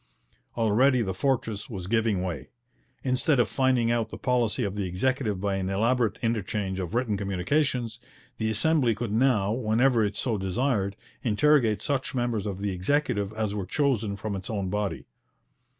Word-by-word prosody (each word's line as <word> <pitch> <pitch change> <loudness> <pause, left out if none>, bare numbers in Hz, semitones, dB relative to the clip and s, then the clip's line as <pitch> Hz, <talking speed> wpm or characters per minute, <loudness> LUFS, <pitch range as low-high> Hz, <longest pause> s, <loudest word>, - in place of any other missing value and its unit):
Already 120 +3 +3
the 95 -2 -2
fortress 115 -2 -1
was 95 -6 -5
giving 110 -2 +1
way. 85 -8 -4 0.5
Instead 130 +2 +2
of 120 - +4
finding 130 -3 +2
out 115 -2 0
the - - -7
policy 125 -1 +1
of 100 -3 -2
the 100 -2 -2
Executive 105 +2 0
by 100 0 -1
an 95 -1 -2
elaborate 115 +3 +1
interchange 105 -4 -1
of 90 +2 -4
written 120 -4 +1
communications, 115 +5 -1 0.4
the 110 -1 0
Assembly 120 +1 +2
could 115 -1 -4
now, 110 -4 +2
whenever 115 +1 +2
it 105 -1 -1
so 115 -5 0
desired, 100 0 0 0.3
interrogate 120 -1 +3
such 140 0 -2
members 120 -4 -1
of 100 -2 -3
the 100 -1 -1
Executive 105 +1 0
as 110 -2 -2
were 100 -3 -3
chosen 115 -6 0
from 105 0 -4
its 95 -1 -6
own 100 -4 -2
body. 105 -1 -2
110 Hz, 165 wpm, -27 LUFS, 100-125 Hz, 0.5 s, of